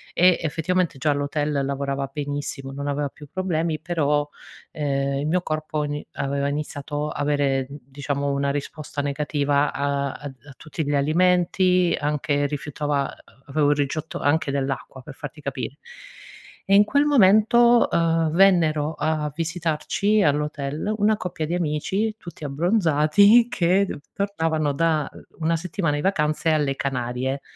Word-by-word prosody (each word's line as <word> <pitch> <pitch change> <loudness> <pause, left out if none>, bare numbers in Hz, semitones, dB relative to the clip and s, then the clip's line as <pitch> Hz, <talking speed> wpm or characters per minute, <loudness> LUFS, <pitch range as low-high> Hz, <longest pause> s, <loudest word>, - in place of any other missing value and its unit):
e 180 0 +5
effettivamente 165 0 -1
già 150 +2 +2
l'hotel 145 0 -1
lavorava 140 0 -2
benissimo 145 -1 -4
non 140 +1 -6
aveva 145 0 -1
più 150 +2 -14
problemi 165 -4 -1
però, 150 -4 0 0.4
ehm, 140 -2 -1
il - - -3
mio 180 +3 +1
corpo 155 -1 -3
ni 145 0 -4
aveva 140 0 -1
iniziato 145 0 -3
avere 145 -3 0
n 140 +2 -10
diciamo 140 +1 -3
una 140 0 0
risposta 145 +1 -4
negativa 145 0 0
a 140 -1 -1
ad 145 -2 -8
a 140 - -11
tutti 155 +2 -5
gli 145 - -1
alimenti, 180 +4 +2
anche 145 -1 0
rifiutava 145 -1 -2 0.4
avevo 145 +1 +2
il - - +3
rigetto 145 +3 -2
anche 145 0 +1
dell'acqua, 135 -1 -3
per 140 +1 -11
farti 150 - -9
capire. 140 0 -5 0.9
E 195 - +4
in 205 - +8
quel 285 +6 +2
momento, 235 -1 +5
uhm, 165 -1 +2
vennero 160 -4 +3
a 150 0 -1
visitarci 170 +5 0
all'hotel 150 +4 -1
una 215 0 +2
coppia 175 -5 -4
di 170 - -1
amici 190 +7 -1
tutti 170 -6 -10
abbronzati, 175 - +4
che 185 +1 +2
duv - - -6
tornavano 160 -7 -1
da, 155 -1 +1
uhm, - - -13 0.2
una 165 +1 +1
settimana 165 -3 -2
di - - -2
vacanze 155 -3 +1
alle 145 -3 +1
Canarie. 130 +1 -2
150 Hz, 145 wpm, -23 LUFS, 140-170 Hz, 0.9 s, in